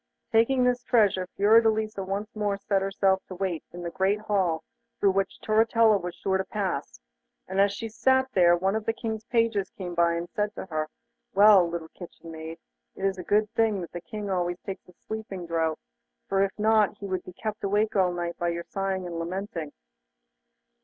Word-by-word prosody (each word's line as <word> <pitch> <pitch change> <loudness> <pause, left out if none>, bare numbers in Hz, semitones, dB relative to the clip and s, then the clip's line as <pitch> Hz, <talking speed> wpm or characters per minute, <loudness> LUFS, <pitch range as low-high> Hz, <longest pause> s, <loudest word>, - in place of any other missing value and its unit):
Taking 240 +3 +4
this 250 0 +2
treasure 205 -7 +2
Fiordelisa 220 0 +3
once 200 +4 -4
more 205 -2 0
set 200 -1 0
herself 195 0 +1
to 185 - -8
wait 180 -3 -2
in 175 0 -8
the 170 - -4
great 195 +3 +1
hall 190 -7 0 0.4
through 200 - +4
which 195 0 -1
Turritella 220 -1 +4
was 175 0 -5
sure 190 +1 0
to - - +1
pass, 190 - -3 0.5
and 190 +1 +1
as 200 0 +4
she 225 +3 -5
sat 260 +4 +2
there 175 -2 +5
one 190 +3 0
of 220 -1 -2
the 225 - +1
King's 220 -2 -4
pages 230 -5 +1
came 180 -2 -7
by, 170 0 +3
and 170 +1 -3
said 210 0 -2
to - - -6
her: 155 -4 -3 0.5
'Well, 200 -3 +7
little 165 -1 -5
kitchen 170 -1 -11
maid, 160 +1 -7 0.4
it 195 - -3
is 195 -1 0
a - - -5
good 210 +3 +2
thing 225 -3 +2
that 170 - -7
the 175 - -6
King 205 +5 -6
always 175 -1 0
takes 195 -1 -7
a - - -16
sleeping 215 -5 -5
draught, 165 -1 -1 0.5
for 195 -2 +1
if 195 0 0
not 215 -1 +3
he 200 - -8
would 185 -2 -2
be 185 - -10
kept 215 +2 -5
awake 210 +2 +1
all 185 -2 +3
night 175 -1 -4
by 175 - 0
your 170 0 -3
sighing 195 -1 -3
and 170 -1 -5
lamenting. 170 -3 -4
195 Hz, 200 wpm, -27 LUFS, 175-215 Hz, 0.5 s, Well